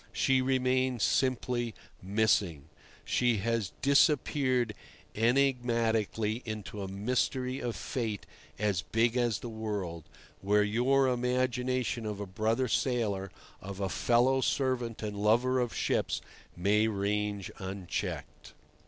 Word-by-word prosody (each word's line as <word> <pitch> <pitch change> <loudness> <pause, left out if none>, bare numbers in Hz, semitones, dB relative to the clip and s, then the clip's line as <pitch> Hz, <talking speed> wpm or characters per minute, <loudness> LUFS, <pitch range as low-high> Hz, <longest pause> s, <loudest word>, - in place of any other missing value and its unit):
She 130 -1 +2
remains 130 -2 +1
simply 125 -3 0 0.3
"missing"; 95 -7 +1 0.4
she 120 -2 +2
has 115 -1 -1
disappeared 135 -4 +3 0.4
enigmatically 115 -3 +1
into 105 -2 -6
a 95 - -4
mystery 125 +6 -1
of 120 -2 -3
fate 110 -5 -3 0.3
as 100 -5 0
big 115 +8 +1
as 120 -4 +1
the - - -5
world, 105 -8 -4 0.4
where 105 +2 +3
your 125 +6 +3
imagination 125 -1 0
of 105 -1 -4
a 100 - -3
brother 110 +6 0
sailor, 110 -6 0 0.3
of 95 0 -7
a 95 -1 -1
fellow 125 +6 +3
servant 125 -5 -1
and 105 -1 -3
lover 120 +5 +3
of 120 -2 0
ships, - - 0 0.4
may 105 +4 +3
range 105 -1 -1
unchecked. 95 -1 -5
115 Hz, 115 wpm, -30 LUFS, 105-125 Hz, 0.4 s, disappeared